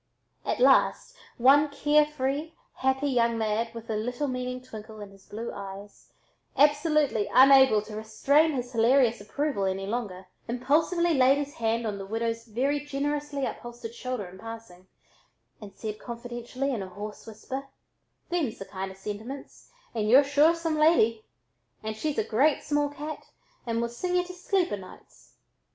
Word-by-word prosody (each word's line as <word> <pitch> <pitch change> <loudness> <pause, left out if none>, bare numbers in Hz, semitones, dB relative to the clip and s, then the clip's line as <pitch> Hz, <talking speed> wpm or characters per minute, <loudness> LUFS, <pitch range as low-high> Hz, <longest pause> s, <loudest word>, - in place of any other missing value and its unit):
At - - -2
last, - - +3 0.2
one 280 +5 +5
care 295 +1 +3
free, 295 +2 -3 0.2
happy 265 +2 +1
young 235 -3 +2
lad, 220 +1 -1
with 230 0 -8
a 220 - -2
little 245 +6 -2
meaning 250 -1 -3
twinkle 220 -3 -10
in 205 -1 -9
his 195 -1 -19
blue 225 +3 -5
eyes, 200 +1 -10 0.5
absolutely 290 -5 +3
unable 265 -5 +7
to 215 0 -9
restrain 280 +9 +2
his 250 -2 -4
hilarious 235 0 +3
approval 240 0 -2
any 190 0 -2
longer, 200 -4 -4 0.2
impulsively 315 +8 +1
laid 265 0 +5
his 285 0 -4
hand 230 0 -1
on 205 -2 -3
the 195 - -6
widow's 230 +1 -2
very 265 +6 0
generously 290 0 -2
upholstered 240 -1 -7
shoulder 255 -4 -4
in 180 +1 -12
passing, 225 -5 -10 0.7
and 200 -2 -11
said 215 0 -6
confidentially 240 +3 -4
in 225 - -2
a 190 - -6
hoarse 205 +4 -8
whisper: 260 +5 -6 0.6
"Thems 325 -10 -1
the 195 - -7
kind 190 0 -5
of 190 - -12
sentiments, 215 +7 -8 0.2
and 215 -2 -1
y'u're 265 +5 +8
sure 290 +4 +4
some 325 -2 -2
lady! 230 -9 +4 0.6
And 215 0 -3
she's 295 +6 -3
a - - +2
great 265 +8 +2
small 290 0 +1
cat 295 +1 -7 0.4
and 230 0 0
will 235 - 0
sing 360 +10 -3
y'u 360 - +3
to 365 0 -9
sleep 370 0 0
o' 205 - -1
nights." 185 -1 -15
245 Hz, 165 wpm, -27 LUFS, 215-290 Hz, 0.7 s, y'u're